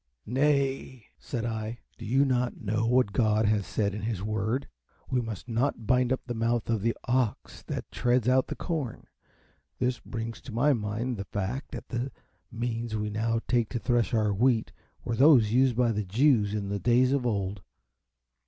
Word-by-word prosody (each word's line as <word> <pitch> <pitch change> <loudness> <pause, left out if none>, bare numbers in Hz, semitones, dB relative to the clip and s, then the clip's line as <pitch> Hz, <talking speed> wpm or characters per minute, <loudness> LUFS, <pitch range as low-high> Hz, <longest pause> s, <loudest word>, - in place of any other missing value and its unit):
"Nay," 135 -1 0
said 120 -3 -4
I, 110 0 -3 0.2
"do 115 - -7
you 135 +6 +3
not 125 -2 0
know 110 +2 0
what 125 -4 +3
God 110 -2 +2
has 105 -2 +1
said 100 -2 0
in 105 - -5
his 105 -4 -3
Word? 110 +5 -1 0.4
We 125 -1 +2
must 115 -1 -6
not 120 0 -1
bind 125 +1 +2
up 130 - 0
the 120 - -3
mouth 115 0 0
of 110 -3 0
the 115 +2 0
ox 125 -3 -1
that - - -5
treads 125 -1 +1
out 130 +1 +3
the - - -4
corn. 155 -9 -4 0.7
This 125 -2 0
brings 115 +1 -6
to 130 - -10
my 130 +6 +3
mind 115 +2 -2
the 100 - -5
fact 105 +8 -3
that - - -7
the 125 +2 -2 0.4
means 115 -1 -3
we 105 0 -2
now 115 +2 0
take 120 -3 +1
to 120 - -3
thresh 120 +1 +1
our 110 -3 +2
wheat 115 +2 +2 0.3
were 115 - -1
those 125 -5 +6
used 130 -1 +4
by 120 -1 +3
the 105 -1 -1
Jews 105 0 +3
in 100 -2 -3
the 100 0 -2
days 125 +4 +3
of 135 -3 +1
old." 100 -3 -2
115 Hz, 185 wpm, -28 LUFS, 110-125 Hz, 0.7 s, those